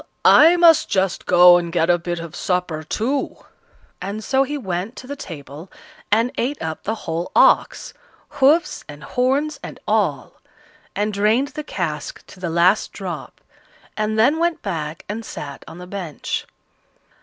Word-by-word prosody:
I 330 Hz, +3 st, +7 dB
must 335 Hz, -2 st, +5 dB
just 190 Hz, -1 st, -1 dB
go 180 Hz, 0 st, +7 dB
and 170 Hz, -1 st, -3 dB
get 165 Hz, 0 st, +2 dB
a 175 Hz, -, +2 dB
bit 175 Hz, 0 st, -4 dB
of 165 Hz, -2 st, -8 dB
supper 180 Hz, -4 st, -2 dB
too;" 245 Hz, -, -2 dB, 0.6 s
and 200 Hz, +4 st, -5 dB
so 265 Hz, +3 st, +2 dB
he 290 Hz, +2 st, -1 dB
went 190 Hz, -1 st, -4 dB
to -, -, -10 dB
the 285 Hz, +2 st, -6 dB
table 155 Hz, -, -10 dB, 0.4 s
and 230 Hz, +4 st, +3 dB
ate 270 Hz, +5 st, -1 dB
up 160 Hz, -1 st, -5 dB
the 220 Hz, -, -2 dB
whole 165 Hz, +2 st, -3 dB
ox -, -, +3 dB, 0.5 s
hoofs, 305 Hz, +6 st, +3 dB
and 145 Hz, 0 st, -10 dB
horns, 275 Hz, +4 st, 0 dB
and -, -, -9 dB
all -, -, -1 dB, 0.5 s
and 210 Hz, +1 st, -1 dB
drained 215 Hz, +7 st, +2 dB
the 305 Hz, -, -7 dB
cask 160 Hz, -, -5 dB
to -, -, -15 dB
the 180 Hz, -2 st, -3 dB
last 175 Hz, +5 st, +2 dB
drop, -, -, -7 dB, 0.5 s
and 215 Hz, 0 st, -1 dB
then 265 Hz, +9 st, +3 dB
went 340 Hz, -1 st, 0 dB
back 160 Hz, -5 st, -4 dB
and 220 Hz, +3 st, -5 dB
sat 140 Hz, -9 st, -8 dB
on -, -, -10 dB
the 180 Hz, -, -9 dB
bench. 180 Hz, -5 st, -5 dB
195 Hz, 160 wpm, -21 LUFS, 170-260 Hz, 0.6 s, I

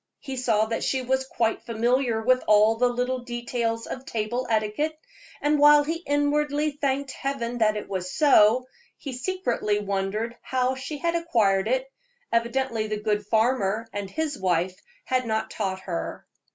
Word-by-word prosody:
He 270 Hz, -, -7 dB
saw 225 Hz, -4 st, +2 dB
that 225 Hz, +1 st, -3 dB
she 265 Hz, -1 st, 0 dB
was 265 Hz, +1 st, 0 dB
quite 225 Hz, -3 st, 0 dB
familiar 235 Hz, 0 st, 0 dB
with 255 Hz, +2 st, +3 dB
all 215 Hz, +1 st, +5 dB
the 245 Hz, +2 st, +2 dB
little 250 Hz, +1 st, -1 dB
details 240 Hz, -1 st, -3 dB
of 260 Hz, -, -6 dB
table 240 Hz, +1 st, -3 dB
etiquette; 220 Hz, +8 st, 0 dB, 0.5 s
and 295 Hz, 0 st, +3 dB
while 295 Hz, 0 st, +7 dB
he 325 Hz, +3 st, -2 dB
inwardly 290 Hz, +1 st, +1 dB
thanked 280 Hz, -1 st, -2 dB
Heaven 245 Hz, -3 st, -3 dB
that 215 Hz, -1 st, +3 dB
it 210 Hz, -, -6 dB
was 185 Hz, -2 st, -3 dB
so, 250 Hz, -5 st, +5 dB, 0.3 s
he 275 Hz, -, -6 dB
secretly 245 Hz, -, -1 dB
wondered 205 Hz, +3 st, -2 dB
how 255 Hz, 0 st, 0 dB
she 265 Hz, +3 st, -6 dB
had 335 Hz, +3 st, 0 dB
acquired 215 Hz, -13 st, +2 dB
it; 260 Hz, +2 st, 0 dB, 0.5 s
evidently 230 Hz, -1 st, 0 dB
the 215 Hz, 0 st, -2 dB
good 210 Hz, -1 st, -1 dB
farmer 220 Hz, -1 st, +1 dB
and 200 Hz, -1 st, -4 dB
his 305 Hz, +2 st, -3 dB
wife 180 Hz, 0 st, 0 dB, 0.3 s
had 255 Hz, -2 st, 0 dB
not 220 Hz, 0 st, -1 dB
taught 190 Hz, -3 st, -3 dB
her. 175 Hz, -3 st, -5 dB
240 Hz, 160 wpm, -25 LUFS, 215-265 Hz, 0.5 s, while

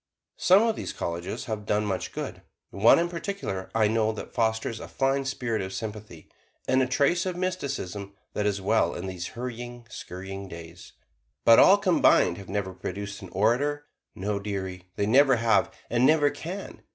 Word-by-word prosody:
Some 190 Hz, +4 st, +6 dB
of 225 Hz, -1 st, +1 dB
these -, -, -5 dB
"Colleges" 85 Hz, +1 st, -4 dB
have 110 Hz, -2 st, -5 dB
done 105 Hz, +1 st, +1 dB
much 95 Hz, -3 st, -2 dB
good; -, -, -6 dB, 0.3 s
one 100 Hz, +4 st, +6 dB
in 170 Hz, -, +2 dB
particular 170 Hz, -, -4 dB
I 110 Hz, -2 st, +4 dB
know, 110 Hz, 0 st, +1 dB
that 110 Hz, -, -8 dB
fosters 110 Hz, -1 st, 0 dB
a -, -, -8 dB
fine 135 Hz, 0 st, 0 dB
spirit 120 Hz, -5 st, -2 dB
of 95 Hz, 0 st, -5 dB
sympathy, 105 Hz, -5 st, -7 dB, 0.4 s
and 130 Hz, 0 st, +3 dB
a 130 Hz, -, +2 dB
trace 150 Hz, +8 st, +2 dB
of 180 Hz, -, -2 dB
mysticism 140 Hz, -, -3 dB, 0.2 s
that 105 Hz, -1 st, 0 dB
is 100 Hz, -1 st, 0 dB
well 95 Hz, -2 st, +1 dB
in -, -, -5 dB
these 90 Hz, -2 st, -5 dB
hurrying, 120 Hz, 0 st, -6 dB
scurrying 95 Hz, +1 st, -7 dB
days. 85 Hz, -1 st, -11 dB, 0.5 s
But -, -, +8 dB
all -, -, +8 dB
combined 85 Hz, -, +3 dB
have 95 Hz, -, -11 dB
never 95 Hz, -1 st, -2 dB
produced 100 Hz, +3 st, -6 dB
an 95 Hz, -, -9 dB
orator; 130 Hz, +10 st, +1 dB, 0.3 s
no, 100 Hz, +2 st, -2 dB
dearie, 95 Hz, -3 st, -5 dB
they 100 Hz, -, 0 dB
never 135 Hz, +4 st, +5 dB
have, 115 Hz, -3 st, +2 dB, 0.2 s
and 120 Hz, +1 st, +1 dB
never 145 Hz, +1 st, +5 dB
can. 175 Hz, +7 st, -7 dB
110 Hz, 175 wpm, -27 LUFS, 95-135 Hz, 0.5 s, But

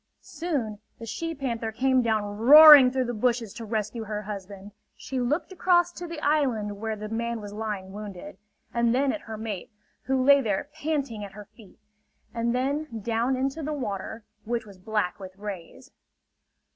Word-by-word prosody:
Soon 265 Hz, -12 st, -3 dB, 0.2 s
the 230 Hz, -, -8 dB
she 330 Hz, +9 st, -4 dB
panther 235 Hz, -5 st, -3 dB
came 260 Hz, +3 st, +2 dB
down 220 Hz, -3 st, +1 dB
roaring 290 Hz, +3 st, +10 dB
through 260 Hz, 0 st, -1 dB
the 240 Hz, -, -3 dB
bushes 230 Hz, -2 st, 0 dB
to 230 Hz, -, -8 dB
rescue 220 Hz, +1 st, -3 dB
her 210 Hz, 0 st, -4 dB
husband. 200 Hz, 0 st, -8 dB, 0.3 s
She 260 Hz, 0 st, -4 dB
looked 285 Hz, +10 st, -1 dB
across 350 Hz, -1 st, +3 dB
to 350 Hz, 0 st, -8 dB
the 335 Hz, -2 st, -6 dB
island 245 Hz, -10 st, 0 dB
where 220 Hz, 0 st, -3 dB
the 215 Hz, 0 st, -7 dB
man 230 Hz, +1 st, -3 dB
was 205 Hz, -1 st, -8 dB
lying 210 Hz, -3 st, -5 dB
wounded; 200 Hz, -3 st, -9 dB, 0.3 s
and 235 Hz, 0 st, +2 dB
then 270 Hz, 0 st, +2 dB
at 315 Hz, -, -5 dB
her 220 Hz, -1 st, -8 dB
mate, 210 Hz, -4 st, -5 dB, 0.4 s
who 265 Hz, -1 st, +1 dB
lay 280 Hz, +1 st, +6 dB
there 220 Hz, +4 st, -2 dB
panting 285 Hz, -8 st, -3 dB
at 200 Hz, -1 st, -9 dB
her 210 Hz, 0 st, -10 dB
feet; 215 Hz, -1 st, -18 dB, 0.6 s
and 235 Hz, +1 st, -1 dB
then 265 Hz, -2 st, -2 dB
down 235 Hz, +4 st, 0 dB
into 270 Hz, +4 st, -2 dB
the 305 Hz, +1 st, -3 dB
water, 220 Hz, -4 st, -5 dB, 0.2 s
which 230 Hz, 0 st, -3 dB
was 200 Hz, -3 st, -14 dB
black 205 Hz, -2 st, -2 dB
with 190 Hz, -1 st, -10 dB
rays. 200 Hz, -5 st, -8 dB
230 Hz, 175 wpm, -26 LUFS, 210-270 Hz, 0.6 s, roaring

